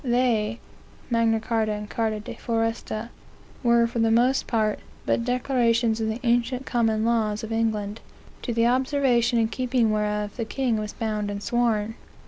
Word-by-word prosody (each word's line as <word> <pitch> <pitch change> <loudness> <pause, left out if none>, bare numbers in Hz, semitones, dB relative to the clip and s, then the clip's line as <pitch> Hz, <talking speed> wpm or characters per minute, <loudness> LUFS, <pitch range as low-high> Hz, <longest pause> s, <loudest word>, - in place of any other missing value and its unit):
"They 235 -3 +1 0.5
(Magna 230 -1 +3
Carta 220 -1 0
and 210 0 -5
Carta 220 0 -1
de 210 - -7
Foresta) 225 -1 -2 0.5
were, 235 -1 +4
for 235 +1 -3
the 225 0 +3
most 245 +4 +3
part, 215 -3 +1 0.3
but 235 - +1
declarations 240 -2 +1
of 220 - 0
the 220 +2 -2
ancient 245 +2 +1
common 225 -2 +1
laws 220 -2 +1
of 220 - -5
England, 220 -2 -1 0.4
to 245 - -3
the 230 0 +2
observation 250 -2 +2
and 225 0 +1
keeping 245 -2 +1
whereof, 210 0 -1
the 230 - -2
king 245 -1 0
was 210 0 -4
bound 215 -2 -2
and 200 0 -5
sworn. 225 -1 +1
230 Hz, 160 wpm, -25 LUFS, 215-240 Hz, 0.5 s, were